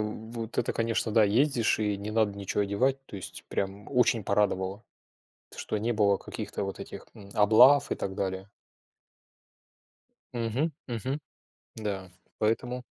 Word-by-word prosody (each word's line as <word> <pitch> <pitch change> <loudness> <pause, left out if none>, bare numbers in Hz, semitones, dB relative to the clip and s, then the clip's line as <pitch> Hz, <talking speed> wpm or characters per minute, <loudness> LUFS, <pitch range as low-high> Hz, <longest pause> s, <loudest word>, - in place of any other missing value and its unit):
вот 110 +2 -5
это - - +1
конечно, 115 -1 0
да, 110 -1 +6
ездишь, 120 +3 +3
и 105 -2 0
не 100 +2 -5
надо 110 -2 +1
ниче 100 0 -2
одевать. 120 +7 +1
То - - -8
есть 95 - -8
прям 100 +1 -3
очень 120 -4 +3
порадовало, 100 0 0 0.7
т - - -14
что 110 - -2
не 110 +3 0
было 100 -3 +3
каких-то - - -5
вот 95 0 -5
этих, - - -8
мм, 100 -1 -13
облав 120 +7 +6
и - - +2
так 95 0 -4
далее. 95 0 -3 1.8
Мгм. 120 +7 -1 0.2
Мгм. 130 +5 -2 0.6
Да. 100 -4 -4 0.3
Поэтому. 120 +3 0
105 Hz, 145 wpm, -29 LUFS, 100-115 Hz, 1.8 s, да